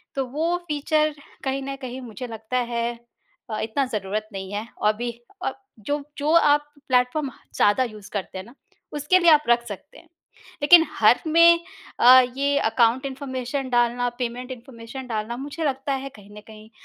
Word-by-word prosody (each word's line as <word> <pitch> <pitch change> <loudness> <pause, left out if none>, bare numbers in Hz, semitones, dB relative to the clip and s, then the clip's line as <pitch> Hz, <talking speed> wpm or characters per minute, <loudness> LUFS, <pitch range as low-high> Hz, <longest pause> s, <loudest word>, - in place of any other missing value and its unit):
तो 270 -1 -1
वो 325 +6 0
फीचर 305 0 +1 0.3
कहीं 270 0 -1
न 275 0 -4
कहीं 255 0 -6
मुझे 250 +1 -7
लगता 225 +2 -4 0.2
है 235 0 0 0.6
अ, 215 - -3
इतना 225 +5 -1
ज़रूरत 210 +1 -3
नहीं 190 0 -6
है 210 +2 -4
और 210 - +2
भी 240 +1 -3 0.3
अ, - - 0 0.3
जो 285 +7 -3
जो 300 +1 0
आप 295 -3 +4 0.2
प्लेटफॉर्म 260 +3 +1 0.2
ज़्यादा 205 +5 +3
यूज़ 215 -5 -8
करते 195 -2 -4
हैं 190 - -7
ना, 240 +4 -16 0.4
उसके 295 +6 +3
लिए 345 -2 +6
आप 300 -1 +5
रख 240 0 +3
सकते 210 +7 -9
हैं। 335 - -18 0.5
लेक़िन 330 +2 +8
हर 220 +3 +4
में 335 +1 +6 0.4
अ, 255 +2 +9 0.2
ये 280 +1 +1
अकाउंट 235 +2 +2
इन्फॉर्मेशन 265 0 -4
डालना, 240 0 +2
पेमेंट 250 +1 -4
इन्फॉर्मेशन 250 +1 -9
डालना 225 0 -3
मुझे 290 +5 -5
लगता 275 0 -1
है 275 - -6
कहीं 205 -1 -16
न - - -9
कहीं 215 0 -13
255 Hz, 175 wpm, -24 LUFS, 225-285 Hz, 0.6 s, अ